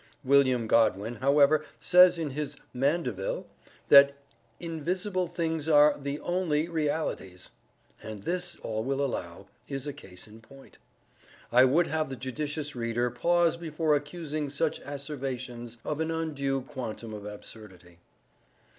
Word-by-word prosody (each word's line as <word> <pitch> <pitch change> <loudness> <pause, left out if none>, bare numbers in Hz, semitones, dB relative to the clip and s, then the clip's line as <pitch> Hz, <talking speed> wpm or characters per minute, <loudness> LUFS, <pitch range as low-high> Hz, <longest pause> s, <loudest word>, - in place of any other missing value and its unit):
William 130 -3 +4
Godwin, 110 0 +2
however, 145 +2 +4 0.2
says 180 0 +6
in 160 -4 -3
his 145 +1 -4 0.2
"Mandeville," 125 - -1 0.4
that 140 0 +8 0.4
"invisible 180 +3 -2
things 160 -2 -2
are 150 -1 +6
the 140 +1 -4
only 170 -3 0
realities," 150 - -3 0.5
and 110 -2 -8
this, 175 0 -2
all 110 0 -2
will 135 +2 -1
allow, 85 -10 -5 0.2
is 135 -1 -4
a 145 - -4
case 95 -11 -11
in 110 +1 -14
point. 135 +4 -17 0.7
I 125 +2 +7
would 155 +7 +3
have 155 -3 -1
the 135 - -5
judicious 145 +4 -4
reader 120 0 -1
pause 170 +6 +2
before 160 -2 0
accusing 150 0 -3
such 150 +3 -1
asseverations 130 -4 -6
of 150 0 -2
an 160 0 -1
undue 145 -5 -1
quantum 120 -5 -7
of 105 -1 -7
absurdity. 100 -4 -11
140 Hz, 130 wpm, -28 LUFS, 120-160 Hz, 0.7 s, that